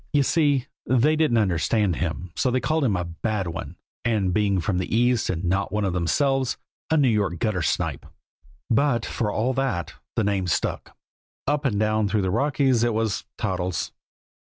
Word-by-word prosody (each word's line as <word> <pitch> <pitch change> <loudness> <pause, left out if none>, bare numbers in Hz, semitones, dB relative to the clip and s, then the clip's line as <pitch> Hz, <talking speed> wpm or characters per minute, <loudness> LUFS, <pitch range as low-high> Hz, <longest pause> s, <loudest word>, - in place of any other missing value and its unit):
You 145 -1 +4
see, 145 -4 +2 0.2
they 130 +5 +3
didn't 155 -7 +2
understand 95 -1 +1
him, 85 0 -3
so 130 - +1
they 130 +1 +1
called 155 +4 0
him 110 -7 +2
a 90 -1 -1
"bad 100 +4 -2
one," 80 -1 -6 0.3
and, 105 -6 +1
being 100 -1 +2
from 90 0 0
the 95 - -2
East 120 -1 +2
and 90 -1 -2
not 95 +3 0
one 105 -1 0
of 95 - -1
themselves, 130 - +1 0.3
"a 160 - +3
New 140 -3 +4
York 105 -7 +1
gutter 95 0 0
snipe." 75 - -1 0.6
But, 120 -1 +2
for 105 -3 -2
all 120 +6 0
that, 95 - -1 0.2
the 115 - +1
name 100 -2 0
stuck. 85 - -2 0.5
Up 145 +1 0
and 105 -7 +1
down 110 0 +2
through 100 0 0
the 95 - 0
Rockies 135 +1 +2
it 120 -2 +1
was 110 -2 -1
Toddles. 90 -1 -2
110 Hz, 185 wpm, -24 LUFS, 95-130 Hz, 0.6 s, You